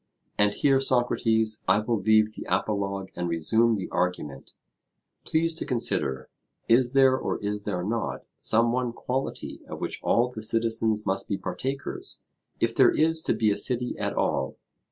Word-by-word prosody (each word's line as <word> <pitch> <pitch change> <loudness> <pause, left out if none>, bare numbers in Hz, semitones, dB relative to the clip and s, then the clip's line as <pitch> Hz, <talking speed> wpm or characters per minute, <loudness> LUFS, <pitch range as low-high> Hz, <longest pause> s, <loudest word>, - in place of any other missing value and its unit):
And 105 0 +2
here, 135 -2 +3
Socrates, 115 -4 +2
I - - +4
will 110 +1 -1
leave 110 +1 +3
the - - -9
apologue 100 -2 -2
and 90 -1 -3
resume 110 +8 +2
the 95 -3 -4
argument. 90 -7 -3 0.7
Please 165 +1 +1
to 160 - -2
consider: 65 - -1 0.4
Is 120 +2 +3
there 135 -1 +5
or - - -2
is 105 0 -3
there 90 -4 -2
not 105 +1 -3
some 115 +1 +3
one 125 -1 -1
quality 130 +2 -4
of - - -7
which - - -3
all 120 +1 +2
the 125 -3 -8
citizens 110 -1 +1
must 95 +1 -1
be 100 - -1
partakers, 140 - -5 0.4
if - - +1
there - - +6
is 160 - +1
to - - 0
be 110 -2 +2
a 100 - -1
city 125 -1 +1
at - - -2
all? 65 0 -1
110 Hz, 165 wpm, -26 LUFS, 100-125 Hz, 0.7 s, there